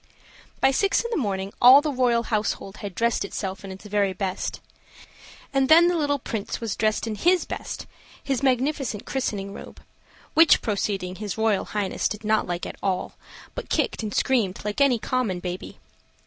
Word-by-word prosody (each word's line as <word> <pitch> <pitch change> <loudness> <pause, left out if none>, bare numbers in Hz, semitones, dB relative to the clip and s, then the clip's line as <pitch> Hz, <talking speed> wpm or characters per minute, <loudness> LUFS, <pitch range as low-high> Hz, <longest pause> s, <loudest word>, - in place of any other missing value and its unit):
By 270 - +5
six 395 +8 +2
in 470 - -5
the - - 0
morning 195 -5 -2
all 255 +3 +10
the 300 0 -1
royal 245 -3 +2
household 210 -2 -2
had 200 -3 -7
dressed 235 0 +1
itself 190 -1 -5
in 195 - -7
its 190 +2 -11
very 200 -2 +1
best; 190 0 -3 0.9
and 270 -1 +2
then 335 +2 +7
the 355 - +1
little 290 -3 +1
Prince 225 -5 -4
was 230 -4 -3
dressed 215 +1 0
in 225 - -3
his 350 - +2
best - - -6 0.4
his 270 -3 -1
magnificent 265 -4 0
christening 200 -7 -3
robe; - - -10 0.5
which 325 0 +6
proceeding 195 -4 -2
his 210 -1 -5
Royal 220 -3 +1
Highness 205 -3 -1
did 210 +1 -6
not 215 0 +1
like 175 0 -3
at - - -8
all, 190 -1 -1 0.4
but - - -7
kicked - - 0
and 215 -2 -4
screamed 210 -6 0
like 210 +6 -2
any 270 -4 +5
common 220 -5 -1
baby. 180 0 -6
215 Hz, 175 wpm, -24 LUFS, 195-265 Hz, 0.9 s, all